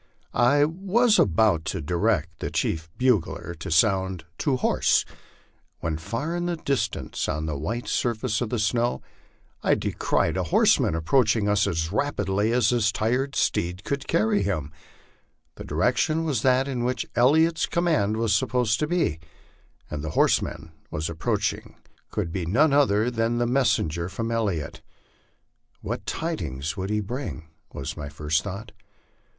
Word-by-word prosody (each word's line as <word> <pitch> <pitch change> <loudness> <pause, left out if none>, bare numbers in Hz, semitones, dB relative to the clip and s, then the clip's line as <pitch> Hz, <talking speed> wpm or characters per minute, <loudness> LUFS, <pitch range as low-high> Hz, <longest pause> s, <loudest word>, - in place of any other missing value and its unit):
I 140 +5 +4
was 200 +8 +2
about 95 -2 +3
to - - -2
direct 85 0 0
the - - -3
chief 80 0 -2
bugler 105 -8 0
to - - -6
sound 95 +1 +2
" - - -41
To 140 -3 +1
horse," - - +2 0.7
when 80 -1 -3
far 115 - -3
in 175 0 -2
the 175 - -1
distance, 140 -4 -2
on 75 0 -2
the 75 -2 -2
white 110 - -4
surface 115 -1 -1
of 120 - -1
the 120 - -1
snow, 115 +3 0 0.6
I - - +3
descried - - 0
a 95 - -1
horseman 80 - +4
approaching 105 +5 +2
us 105 0 +2
as 80 0 -1
rapidly 105 -4 0
as 120 -3 +3
his 115 -3 +2
tired 125 +6 -1
steed 90 +3 0
could 140 +2 -3
carry 105 -1 +2
him. 85 -7 -2 0.8
The - - -9
direction 160 +1 +1
was 145 -9 0
that 130 +1 +3
in 125 -3 -2
which 125 +1 -1
Elliot's 160 +7 +3
command 115 - +1
was 115 -2 +1
supposed 110 +1 +1
to 150 - 0
be, 165 - 0 0.7
and 75 -1 -5
the 80 - -3
horseman 80 +3 +1 0.2
approaching 80 +1 -2 0.3
could 85 - -3
be 90 -2 -3
none 140 - +3
other 125 -5 +3
than 115 0 0
a 120 - +2
messenger 105 - +1
from 115 +3 -3
Elliot. 100 -10 -2 1.0
What - - -5
tidings 80 - -3
would 95 -1 -4
he 105 0 0
bring? 105 - -6 0.2
was 70 - -5
my 75 -1 -6
first 75 +1 0
thought. 105 +3 -7
110 Hz, 150 wpm, -25 LUFS, 85-130 Hz, 1.0 s, I